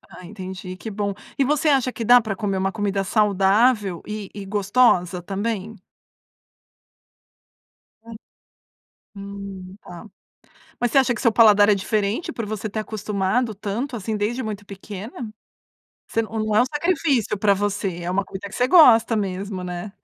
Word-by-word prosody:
Ah 185 Hz, -, -12 dB
entendi, 185 Hz, -1 st, -8 dB
que 220 Hz, +5 st, -7 dB
bom. 200 Hz, -1 st, -2 dB, 0.3 s
E 275 Hz, -, +3 dB
você 300 Hz, +3 st, +1 dB
acha 265 Hz, -3 st, +2 dB
que -, -, -6 dB
dá 245 Hz, +2 st, +8 dB
pra 215 Hz, -3 st, -4 dB
comer 200 Hz, -1 st, -2 dB
uma 190 Hz, 0 st, -1 dB
comida 200 Hz, -2 st, -1 dB
saudável 205 Hz, 0 st, +2 dB
e 210 Hz, -2 st, -6 dB
e 200 Hz, -1 st, -7 dB
gostosa 195 Hz, -3 st, +2 dB
também? 205 Hz, +3 st, -4 dB, 2.3 s
Hum. 230 Hz, -, -10 dB, 1.0 s
Hum, 195 Hz, -2 st, -8 dB
tá. 175 Hz, +4 st, -11 dB, 0.8 s
Mas 245 Hz, -, +1 dB
você 275 Hz, -, +4 dB
acha 260 Hz, -2 st, +3 dB
que 220 Hz, -, -6 dB
seu 230 Hz, -4 st, +3 dB
paladar 210 Hz, -3 st, +6 dB
é 210 Hz, -, +6 dB
diferente 210 Hz, -, -1 dB
por 230 Hz, -, -5 dB
você 215 Hz, 0 st, -4 dB
ter 215 Hz, +1 st, -3 dB
acostumado 215 Hz, +2 st, -1 dB
tanto, 215 Hz, +7 st, -4 dB
assim, 220 Hz, 0 st, -3 dB
desde 230 Hz, +5 st, -2 dB
muito 210 Hz, -2 st, -5 dB
pequena? 205 Hz, +4 st, -8 dB, 0.8 s
Você 225 Hz, -, 0 dB
não 220 Hz, -1 st, -3 dB
é 215 Hz, -, +5 dB
um -, -, +2 dB
sacrifício 295 Hz, -, 0 dB
pra 205 Hz, 0 st, +3 dB
você, 195 Hz, -3 st, -2 dB
é 175 Hz, -, -3 dB
uma 195 Hz, +2 st, 0 dB
comida 195 Hz, +1 st, -8 dB
que -, -, -12 dB
você 250 Hz, -, +2 dB
gosta 245 Hz, -9 st, +6 dB
mesmo, 195 Hz, -1 st, -3 dB
né? 180 Hz, +2 st, -6 dB
210 Hz, 160 wpm, -22 LUFS, 195-230 Hz, 2.3 s, dá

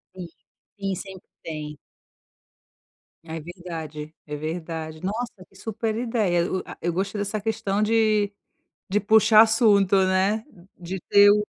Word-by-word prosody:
Sim. 180 Hz, -2 st, -7 dB, 0.5 s
Sim, 195 Hz, -1 st, -1 dB
sempre 190 Hz, 0 st, -9 dB, 0.2 s
tem. 150 Hz, -2 st, -6 dB, 1.5 s
Ai, 160 Hz, 0 st, -5 dB
verdade. 160 Hz, -3 st, -7 dB
É 150 Hz, -1 st, -5 dB
verdade. 160 Hz, 0 st, -5 dB
Nossa, 205 Hz, -1 st, -4 dB
que -, -, -25 dB
super 220 Hz, +2 st, -3 dB
ideia. 210 Hz, -8 st, 0 dB
O 190 Hz, -, 0 dB
a -, -, -10 dB
eu 175 Hz, 0 st, -1 dB
gostei 195 Hz, +4 st, -2 dB
dessa 205 Hz, +1 st, -2 dB
questão 210 Hz, -2 st, -1 dB
de 215 Hz, -2 st, +2 dB, 0.6 s
de 205 Hz, -, +3 dB
puxar 215 Hz, +1 st, +6 dB
assunto, 215 Hz, -4 st, +4 dB
né. 195 Hz, +4 st, +1 dB, 0.3 s
De 180 Hz, +1 st, -6 dB
ter 205 Hz, 0 st, +8 dB
o. 210 Hz, 0 st, +3 dB
195 Hz, 135 wpm, -24 LUFS, 170-215 Hz, 1.5 s, ter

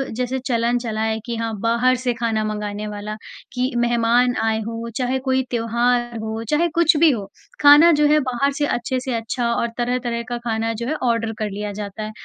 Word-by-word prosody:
जैसे 250 Hz, +2 st, -2 dB
चलन 235 Hz, 0 st, +1 dB
चला 220 Hz, -3 st, -3 dB
है 220 Hz, 0 st, 0 dB
कि 235 Hz, -1 st, -3 dB
हाँ, 225 Hz, 0 st, -3 dB
बाहर 235 Hz, +3 st, +2 dB
से 245 Hz, -1 st, +1 dB
खाना 225 Hz, -2 st, -1 dB
मँगाने 210 Hz, 0 st, -4 dB
वाला, 210 Hz, 0 st, -5 dB, 0.4 s
कि 250 Hz, +1 st, -1 dB
मेहमान 240 Hz, +1 st, +2 dB
आए 220 Hz, 0 st, +1 dB
हों, 230 Hz, 0 st, -5 dB
चाहे 260 Hz, +1 st, 0 dB
कोई 260 Hz, 0 st, +3 dB
त्योहार 240 Hz, 0 st, 0 dB
हो, 220 Hz, +1 st, -4 dB
चाहे 330 Hz, +3 st, +2 dB
कुछ 335 Hz, -2 st, +4 dB
भी 325 Hz, 0 st, +6 dB
हो, 205 Hz, -5 st, -4 dB, 0.3 s
खाना 295 Hz, +4 st, +8 dB
जो 295 Hz, -, +5 dB
है, 305 Hz, -, +5 dB
बाहर 275 Hz, +3 st, +1 dB
से 295 Hz, -, +1 dB
अच्छे 255 Hz, -1 st, -1 dB
से 255 Hz, 0 st, -4 dB
अच्छा 235 Hz, +1 st, -2 dB
और 235 Hz, -, 0 dB
तरह-तरह 240 Hz, -1 st, -1 dB
का 240 Hz, -, -2 dB
खाना 225 Hz, 0 st, 0 dB
जो 235 Hz, +2 st, -5 dB
है, 310 Hz, -, 0 dB, 0.2 s
ऑर्डर 230 Hz, -1 st, 0 dB
कर 215 Hz, -1 st, -1 dB
लिया 205 Hz, +1 st, -4 dB
जाता 205 Hz, +1 st, -6 dB
है। 215 Hz, -, -5 dB
235 Hz, 205 wpm, -21 LUFS, 220-250 Hz, 0.4 s, खाना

